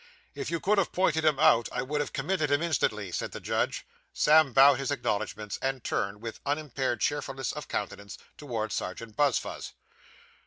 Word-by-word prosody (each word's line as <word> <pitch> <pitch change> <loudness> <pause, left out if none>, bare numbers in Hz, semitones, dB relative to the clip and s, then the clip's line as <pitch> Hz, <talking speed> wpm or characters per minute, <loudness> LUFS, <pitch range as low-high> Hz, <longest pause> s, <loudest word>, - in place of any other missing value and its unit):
'If - - -5
you 170 0 -1
could 205 +3 +2
have 190 - 0
pointed 165 -4 +1
him 155 -3 +3
out, 115 -3 +4
I 125 - -2
would 150 +3 -1
have 145 - -4
committed 180 -6 -1
him 145 +3 +2
instantly,' 110 - 0
said - - -3
the - - -5
judge. - - -1 0.3
Sam 155 -2 +5
bowed 135 +1 +6
his 135 - -2
acknowledgments 105 -6 -2
and 135 -2 -2
turned, 100 +1 -2
with 115 -1 -6
unimpaired 140 -4 -2
cheerfulness 135 -4 -1
of - - -7
countenance, 100 -3 -5 0.2
towards 115 -8 -4
Serjeant 110 +4 -5
Buzfuz. 145 +2 0
135 Hz, 170 wpm, -28 LUFS, 115-150 Hz, 0.3 s, bowed